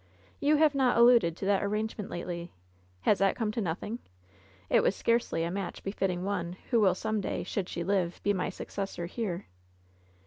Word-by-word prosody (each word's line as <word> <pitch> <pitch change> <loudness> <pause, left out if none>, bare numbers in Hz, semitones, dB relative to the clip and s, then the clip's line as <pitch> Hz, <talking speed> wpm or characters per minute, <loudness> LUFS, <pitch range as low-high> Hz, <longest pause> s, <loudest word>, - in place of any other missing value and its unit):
You 295 +2 +4
have 305 -1 +4
not 260 -4 +3
alluded 235 -8 +6
to - - -4
that 200 0 +3
arrangement 210 0 -2
lately. 175 0 -5 0.5
Has 200 - +3
that 195 0 +3
come 220 -3 -1
to 225 - -2
nothing? 200 +6 -3 0.7
It - - +4
was 195 - +2
scarcely 230 -7 +1
a 170 - -1
match 195 -1 -4
be 195 - -2
fitting 185 -3 -1
one 185 -3 -2
who 235 - +5
will 190 -4 +4
some 220 +1 -1
day, - - -2
should 185 0 -3
she 170 - -3
live, 180 -2 0
be 205 - +3
my 185 - -1
suc - - -8
cessor 195 -3 -4
here. 190 -1 -3
200 Hz, 195 wpm, -30 LUFS, 180-220 Hz, 0.7 s, alluded